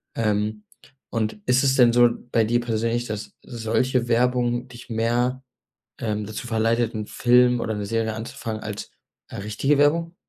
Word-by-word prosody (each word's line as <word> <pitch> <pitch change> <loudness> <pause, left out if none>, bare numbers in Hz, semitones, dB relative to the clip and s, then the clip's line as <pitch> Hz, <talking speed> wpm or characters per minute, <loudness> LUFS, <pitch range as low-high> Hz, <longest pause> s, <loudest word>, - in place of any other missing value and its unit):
Ähm. 105 -1 -1 0.5
Und 110 -2 -2
ist 125 +2 +3
es 135 -1 +3
denn 125 -3 +6
so 120 0 +6 0.2
bei 115 - +3
dir 120 +2 +1
persönlich, 115 +1 -1
dass 110 -2 -6
solche 120 +1 -1
Werbung 120 0 +1
dich 120 0 -13
mehr, 120 +3 0 0.6
ähm, 105 -2 -2
dazu 110 +3 -6
verleitet, 115 +1 +1
'n 105 -1 -4
Film 125 0 +3
oder 110 -2 -2
'ne 105 - -3
Serie 110 +1 -1
anzufangen 110 0 -5
als, 105 -1 -6 0.4
äh, - - -9
richtige 105 +8 0
Werbung? 165 +4 +2
115 Hz, 155 wpm, -24 LUFS, 110-125 Hz, 0.6 s, denn